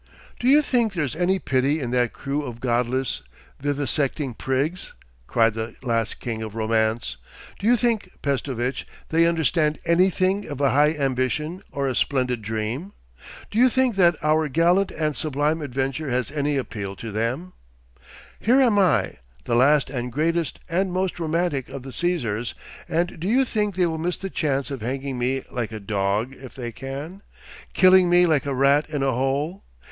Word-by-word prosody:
'Do 245 - -1
you 295 +3 +6
think 235 -7 +1
there's 150 -7 -2
any 180 +3 +2
pity 140 -2 +1
in 125 -4 -3
that 125 -2 +2
crew 140 +2 -3
of 120 -5 -7
Godless, 125 - 0 0.4
Vivisecting 145 -1 0
Prigs?' 140 +9 -2 0.3
cried 115 -1 +3
this 110 +1 -5
last 115 -3 -1
king 115 -2 -4
of 110 -1 -6
romance. 110 - 0 0.4
'Do 200 - -1
you 245 +1 +5
think, 225 -5 0
Pestovitch, 135 -2 -2 0.2
they 165 +1 +4
understand 160 -2 +1
anything 185 +3 +2
of 145 -3 -6
a 140 -3 +3
high 150 +4 +4
ambition 140 +5 -1
or 140 -1 -1
a 130 - 0
splendid 125 -2 0
dream? 110 - -4 0.6
Do 215 - 0
you 255 +1 +6
think 260 -2 +1
that 175 -3 +5
our 155 +1 +3
gallant 175 +6 +3
and 155 -2 -2
sublime 150 +1 0
adventure 135 +2 -2
has 125 +1 -1
any 145 -1 0
appeal 100 -7 -4
to 115 +2 -7
them? 125 - -2 0.9
Here 250 +5 +4
am 235 -6 +4
I, 185 -4 +2 0.3
the 120 - -2
last 135 +3 +4
and 125 -2 -3
greatest 165 +2 0
and 185 +3 0
most 185 0 -1
romantic 160 -4 -1
of 135 -1 -7
the 135 - -8
Cæsars, 120 -10 -1 0.3
and 175 +1 -1
do 175 - -3
you 260 +5 +3
think 210 -5 -1
they 185 -1 +3
will 160 -2 -2
miss 175 +2 -1
the 195 -1 -6
chance 140 -3 -1
of 135 -4 -5
hanging 130 +2 -3
me 130 +2 0
like 120 -3 -3
a 110 - -5
dog 100 +4 -1
if 130 -2 -12
they 120 -3 -5
can, 140 - -7 0.5
killing 185 -1 +6
me 175 0 +6
like 155 -4 +2
a 140 - -1
rat 140 +3 +3
in 145 -3 -2
a 135 - +2
hole? 140 +8 -1
145 Hz, 175 wpm, -24 LUFS, 125-175 Hz, 0.9 s, you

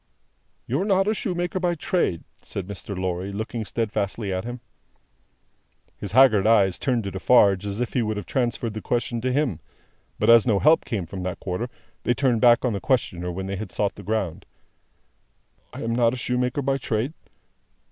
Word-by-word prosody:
"You - - -1
are - - +1
not 195 -1 +2
a 215 - +3
shoemaker 180 -4 -2
by 175 -1 0
trade?" 150 - -1 0.2
said 95 - -6
Mr. 100 0 -7
Lorry, 95 +1 -2
looking 110 +3 -4
steadfastly 105 -2 -2
at 95 +3 -3
him. 120 +1 -5 1.4
His 100 -1 -6
haggard 110 -6 +6
eyes 100 -5 +4
turned 125 -4 0
to 100 - -4
Defarge 100 -1 +4
as 100 +2 -4
if 125 - -2
he 125 - +2
would 110 -1 -2
have 105 - -5
transferred 120 -2 -1
the 110 - -5
question 120 -1 -1
to 130 +2 0
him: 125 - 0 0.6
but - - 0
as 115 0 +7
no 110 -4 +3
help 155 +10 +4
came 100 -6 -3
from 95 +3 -7
that 90 -1 -4
quarter, 100 +6 -3 0.3
they 120 - +1
turned 125 -4 +1
back 120 0 +5
on 120 - +1
the 100 - -3
questioner 90 -9 0
when 95 +2 -5
they 100 0 -3
had 105 -1 -6
sought 100 -2 0
the - - -11
ground. 100 -4 -3 1.2
"I - - -7
am 115 0 -1
not 120 0 +3
a - - -6
shoemaker 125 +3 -1
by 135 +1 0
trade? 120 +4 -2
115 Hz, 190 wpm, -24 LUFS, 100-125 Hz, 1.4 s, as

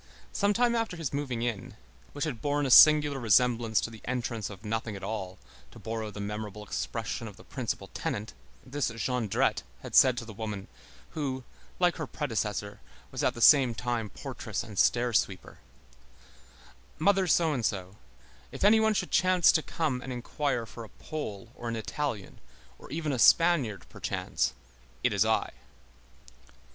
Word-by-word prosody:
Some 200 0 +2
time 235 +2 +2
after 225 -6 -1
his 160 -5 -4
moving 130 -5 -2
in, 120 -4 -4 0.4
which 145 +1 -2
had 125 -8 -4
borne 145 0 0
a 130 - 0
singular 150 0 +8
resemblance 115 -1 +3
to 115 - -4
the 110 - -12
entrance 120 -3 -3
of 100 +1 -11
nothing 110 0 -3
at 95 - -9
all, 95 -3 -4 0.3
to - - -15
borrow 110 -1 -4
the 105 - -9
memorable 105 0 -5
expression 105 - -4
of - - -11
the - - -14
principal - - -4
tenant, 105 +1 -4 0.3
this 130 0 -1
Jondrette 115 -1 0 0.2
had - - -8
said 130 -2 +6
to 115 - -4
the 110 - -9
woman, 105 -2 -5 0.4
who, 135 -4 -3 0.3
like 175 -1 +2
her 160 -4 -4
predecessor, 105 -8 -3 0.3
was - - -3
at - - +1
the 120 - -7
same 130 -6 +7
time 120 -2 -2
portress - - -5
and 105 -3 -6
stair 120 0 +3
sweeper: 95 -2 -1 1.4
"Mother 190 +3 +3
So 165 -3 +3
and 125 -5 -2
So, 95 -2 -2 0.5
if - - -6
any 215 +2 +6
one 220 -1 +2
should - - -1
chance 185 -1 +5
to 160 - +2
come 150 -6 -2
and 130 - -7
inquire 125 0 -2
for 115 +1 -10
a 110 - -11
Pole 110 -11 -7
or 120 - -6
an 115 - -2
Italian, 115 -2 -4 0.4
or - - -13
even 155 +1 -2
a 130 - -2
Spaniard, 140 - +4
perchance, - - -2 0.5
it - - +2
is - - +3
I." - - +1
120 Hz, 170 wpm, -29 LUFS, 110-150 Hz, 1.4 s, singular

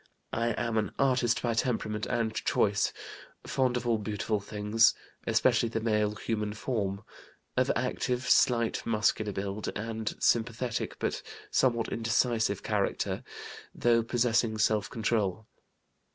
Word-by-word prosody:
I 115 0 +1
am 115 -1 0
an 105 -3 -3
artist 125 -4 +2
by 120 -1 +1
temperament 110 -3 -1
and 110 -2 0
choice, 100 -2 +1 0.5
fond 130 -2 +1
of 125 - -4
all 115 -2 +2
beautiful 105 0 -2
things, 105 +3 +2 0.3
especially 115 - +3
the 115 - -2
male 105 -2 +1
human 105 0 -2
form; 105 -4 -2 0.5
of - - +2
active, 125 0 -1
slight, 115 -2 +3
muscular 110 -1 +1
build; 100 +2 -4
and 110 +1 -3
sympathetic, 115 0 0
but - - -2 0.3
somewhat 120 -3 +2
indecisive 115 0 +1
character, - - -1 0.5
though 120 -1 +3
possessing 115 -1 +1
self 110 -1 +2
control. 110 -3 -1
110 Hz, 125 wpm, -29 LUFS, 105-120 Hz, 0.5 s, especially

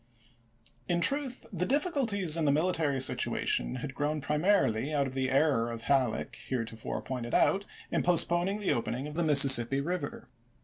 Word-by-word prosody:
In 175 - 0
truth 270 - +3
the 180 -1 -2
difficulties 250 - 0
in 165 -2 -1
the 140 - +2
military 155 -3 -1
situation - - +1
had 135 - -8
grown 150 +2 -3
primarily 150 - 0
out 145 -2 0
of 130 - -7
the 130 -1 -2
error 135 -4 +1
of 115 -1 -8
Halleck 130 -4 -1
heretofore 115 -3 -5
pointed 120 -2 -5
out 200 +1 +1 0.3
in - - 0
postponing 175 +3 +1
the 205 - 0
opening 120 +3 -4
of 150 - -8
the 170 - -2
Mississippi 135 -4 +5
River. 145 -4 -5
150 Hz, 160 wpm, -28 LUFS, 130-180 Hz, 0.3 s, Mississippi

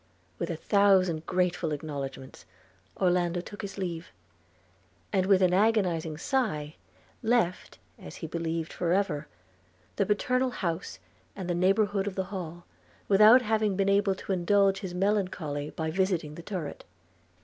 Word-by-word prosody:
With - - -2
a - - -2
thousand 190 -5 +3
grateful 180 -3 0
acknowledgments 140 -3 -6 0.6
Orlando 180 -1 +2
took 205 +4 -8
his 200 0 -7
leave; 175 -3 -4 1.1
and 190 -1 +2
with 195 -1 +5
an 180 -1 +3
agonizing 180 -7 +1
sigh 160 - -1 0.5
left, 225 -7 0 0.2
as 80 - -10
he - - -7
believed 165 0 -3
for 175 -1 0
ever, 160 -7 0 0.7
the 200 - +2
paternal 255 +5 +1
house 175 -7 -4 0.4
and 190 -3 -6
the 175 - 0
neighbourhood 195 +3 +2
of 195 - -4
the 190 - -1
Hall, 175 -2 -6 0.4
without 215 +5 +7
having 215 -2 +1
been 195 0 +1
able 200 -1 +3
to 195 - -6
indulge 195 +2 +3
his 185 -4 -6
melancholy 180 -7 -1
by 160 -1 -3
visiting 180 -4 0
the 170 - -9
turret. 175 -4 -6
185 Hz, 140 wpm, -28 LUFS, 165-200 Hz, 1.1 s, without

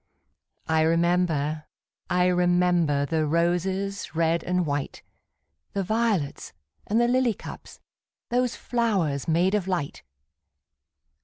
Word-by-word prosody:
I 160 0 +2
remember, 160 -2 +1 0.4
I 180 0 +2
remember, 175 -4 +2
The 155 +1 0
roses, 180 +4 -1
red 165 +1 +1
and 180 -1 0
white, 145 -2 -3 0.7
The 195 - -1
violets, 215 -7 -1 0.3
and 220 +3 +2
the 240 - +3
lily 250 -2 +2
cups, - - -10 0.5
Those 245 0 0
flowers 195 - -1
made 175 +4 +2
of 205 -3 0
light! 175 -7 -3
175 Hz, 105 wpm, -25 LUFS, 160-195 Hz, 0.7 s, the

